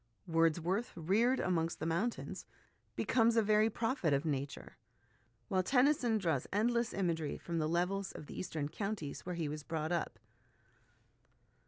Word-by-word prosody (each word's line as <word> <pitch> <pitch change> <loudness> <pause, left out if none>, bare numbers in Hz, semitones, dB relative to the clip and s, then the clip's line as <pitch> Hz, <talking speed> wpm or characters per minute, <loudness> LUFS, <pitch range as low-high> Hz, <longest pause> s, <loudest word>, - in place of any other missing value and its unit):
Wordsworth, 170 +7 +1
reared 210 +10 +2
amongst 165 -2 0
the - - -3
mountains, 175 +9 -2 0.5
becomes 230 -1 +3
a 225 - +5
very 215 +1 +4
prophet 225 - 0
of 140 +3 +1
Nature; 140 -2 -3 0.7
while 185 - +2
Tennyson 250 +1 +3
draws 165 -10 0
endless 235 +3 +1
imagery 165 -5 -1
from 170 -1 -3
the 155 0 0
levels 185 +3 0
of - - -9
the - - -9
eastern 155 -5 -3
counties 195 -3 -4
where 180 - -2
he 165 -3 -2
was 150 +1 -4
brought 160 +1 -3
up. 170 -2 -1
180 Hz, 145 wpm, -34 LUFS, 160-220 Hz, 0.7 s, a